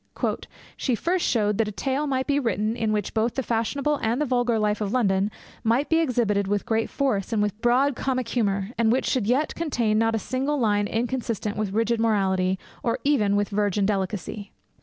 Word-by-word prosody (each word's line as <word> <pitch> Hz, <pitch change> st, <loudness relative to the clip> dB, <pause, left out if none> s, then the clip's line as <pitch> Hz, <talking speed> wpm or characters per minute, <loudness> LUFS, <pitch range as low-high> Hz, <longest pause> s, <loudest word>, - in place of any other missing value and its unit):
'She 255 Hz, -, 0 dB
first 350 Hz, +9 st, 0 dB
showed 210 Hz, -3 st, +1 dB
that 225 Hz, -, +2 dB
a -, -, -3 dB
tale 270 Hz, +7 st, -1 dB
might 260 Hz, -1 st, 0 dB
be 285 Hz, -1 st, +1 dB
written 220 Hz, -3 st, 0 dB
in 225 Hz, -2 st, -1 dB
which 210 Hz, -2 st, -1 dB
both 225 Hz, +1 st, 0 dB
the 265 Hz, -, -1 dB
fashionable 275 Hz, +6 st, 0 dB
and 230 Hz, +3 st, 0 dB
the 300 Hz, -, +1 dB
vulgar 245 Hz, -3 st, +1 dB
life 210 Hz, 0 st, 0 dB
of 200 Hz, -2 st, -1 dB
London 200 Hz, -5 st, +2 dB, 0.3 s
might 235 Hz, +6 st, +1 dB
be 325 Hz, -, +4 dB
exhibited 225 Hz, -9 st, +1 dB
with 205 Hz, 0 st, -1 dB
great 225 Hz, 0 st, 0 dB
force, 250 Hz, -9 st, -1 dB
and 225 Hz, -, +1 dB
with 210 Hz, +1 st, -1 dB
broad 255 Hz, +3 st, +3 dB
comic 255 Hz, -2 st, -1 dB
humour, 200 Hz, -3 st, 0 dB
and 225 Hz, -1 st, +4 dB
which 255 Hz, -, +1 dB
should 245 Hz, -6 st, 0 dB
yet 265 Hz, +6 st, +1 dB
contain 235 Hz, -10 st, 0 dB
not 225 Hz, 0 st, +2 dB
a -, -, +2 dB
single 265 Hz, +6 st, -1 dB
line 205 Hz, -3 st, +2 dB
inconsistent 230 Hz, -2 st, -2 dB
with 210 Hz, -2 st, -2 dB
rigid 225 Hz, +1 st, +1 dB
morality, 190 Hz, -4 st, +1 dB, 0.2 s
or 230 Hz, -, 0 dB
even 220 Hz, -9 st, +2 dB
with 205 Hz, 0 st, +1 dB
virgin 205 Hz, -1 st, +1 dB
delicacy. 200 Hz, 0 st, -3 dB
225 Hz, 200 wpm, -25 LUFS, 205-255 Hz, 0.3 s, be